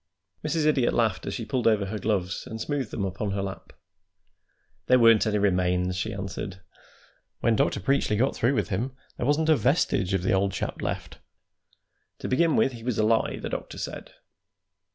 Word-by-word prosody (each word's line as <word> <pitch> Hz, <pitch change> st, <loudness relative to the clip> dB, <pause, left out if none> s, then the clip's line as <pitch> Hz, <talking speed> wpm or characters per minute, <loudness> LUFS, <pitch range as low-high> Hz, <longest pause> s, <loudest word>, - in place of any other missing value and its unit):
Mrs. 155 Hz, 0 st, 0 dB
Idiot 140 Hz, -5 st, +2 dB
laughed 110 Hz, -6 st, +1 dB
as -, -, -3 dB
she -, -, -4 dB
pulled 125 Hz, -3 st, 0 dB
over 105 Hz, -3 st, +3 dB
her 105 Hz, +2 st, -4 dB
gloves 95 Hz, -3 st, -1 dB
and 110 Hz, -2 st, -6 dB
smoothed 135 Hz, -1 st, -2 dB
them 100 Hz, -, -3 dB
upon 95 Hz, +1 st, -3 dB
her 100 Hz, -1 st, -1 dB
lap. 95 Hz, -1 st, -7 dB, 1.2 s
"There 125 Hz, -, +6 dB
weren't 115 Hz, -3 st, +6 dB
any 105 Hz, -1 st, +1 dB
remains," 90 Hz, -2 st, +1 dB
she 100 Hz, +5 st, -2 dB
answered. 95 Hz, -1 st, -5 dB, 0.8 s
"When 115 Hz, -, +3 dB
Dr. 105 Hz, -, +1 dB
Preachly 105 Hz, 0 st, +1 dB
got 130 Hz, +5 st, +1 dB
through 125 Hz, +4 st, +1 dB
with 105 Hz, -, 0 dB
him 120 Hz, +8 st, -2 dB, 0.2 s
there 120 Hz, -, -2 dB
wasn't 155 Hz, +2 st, +2 dB
a 155 Hz, -, +7 dB
vestige 125 Hz, -, +1 dB
of 90 Hz, -, -1 dB
the 95 Hz, -, +2 dB
old 95 Hz, 0 st, +1 dB
chap -, -, -4 dB
left. -, -, -4 dB, 1.0 s
To -, -, -5 dB
begin 160 Hz, +5 st, +2 dB
with, 135 Hz, -, +3 dB
he 120 Hz, -2 st, -10 dB
was 125 Hz, -2 st, -1 dB
a 110 Hz, -, +2 dB
lie, 110 Hz, 0 st, +2 dB
the -, -, -5 dB
doctor -, -, -5 dB
said. -, -, -6 dB
110 Hz, 190 wpm, -26 LUFS, 95-130 Hz, 1.2 s, a